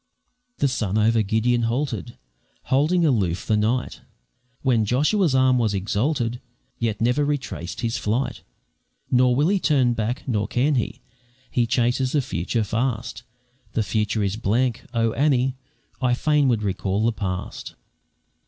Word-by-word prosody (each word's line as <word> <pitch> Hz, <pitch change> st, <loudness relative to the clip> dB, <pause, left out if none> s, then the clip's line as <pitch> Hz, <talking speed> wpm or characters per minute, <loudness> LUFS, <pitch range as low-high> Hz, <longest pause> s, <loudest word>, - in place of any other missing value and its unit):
The 140 Hz, -, +2 dB
sun 110 Hz, -6 st, -1 dB
over 110 Hz, +1 st, +3 dB
Gideon 110 Hz, +4 st, +1 dB
halted, 120 Hz, +1 st, -2 dB, 0.6 s
Holding 165 Hz, +6 st, +3 dB
aloof 95 Hz, -, +1 dB
the 110 Hz, -, +2 dB
night, 115 Hz, +4 st, -1 dB, 0.6 s
When 120 Hz, -5 st, +3 dB
Joshua's 145 Hz, -, +2 dB
arm 130 Hz, -1 st, +4 dB
was 110 Hz, -3 st, +1 dB
exalted, 115 Hz, +5 st, -1 dB, 0.4 s
Yet 110 Hz, -3 st, -1 dB
never 125 Hz, +5 st, +2 dB
retraced 135 Hz, -, -3 dB
his 115 Hz, -2 st, -1 dB
flight; 115 Hz, +6 st, -1 dB, 0.7 s
Nor 125 Hz, 0 st, +4 dB
will 150 Hz, +6 st, +2 dB
he 200 Hz, 0 st, +2 dB
turn 140 Hz, -6 st, +2 dB
back, 115 Hz, +4 st, -3 dB
nor 105 Hz, -5 st, 0 dB
can 130 Hz, +6 st, +1 dB
he, 125 Hz, -5 st, -2 dB, 0.5 s
He 120 Hz, -2 st, +1 dB
chases 125 Hz, +2 st, +1 dB
the 150 Hz, -, +3 dB
future 110 Hz, +4 st, -1 dB
fast; 115 Hz, 0 st, -2 dB, 0.5 s
The 115 Hz, -, +1 dB
future 105 Hz, +2 st, 0 dB
is 100 Hz, +1 st, -1 dB
blank 120 Hz, +3 st, 0 dB
oh, 115 Hz, -2 st, +1 dB
Annie! 135 Hz, -3 st, +2 dB, 0.5 s
I 125 Hz, -1 st, +2 dB
fain 150 Hz, +1 st, +2 dB
would 115 Hz, -4 st, +1 dB
recall 100 Hz, +1 st, -1 dB
the 115 Hz, -, +3 dB
past. 95 Hz, -4 st, -5 dB
120 Hz, 145 wpm, -23 LUFS, 110-130 Hz, 0.7 s, arm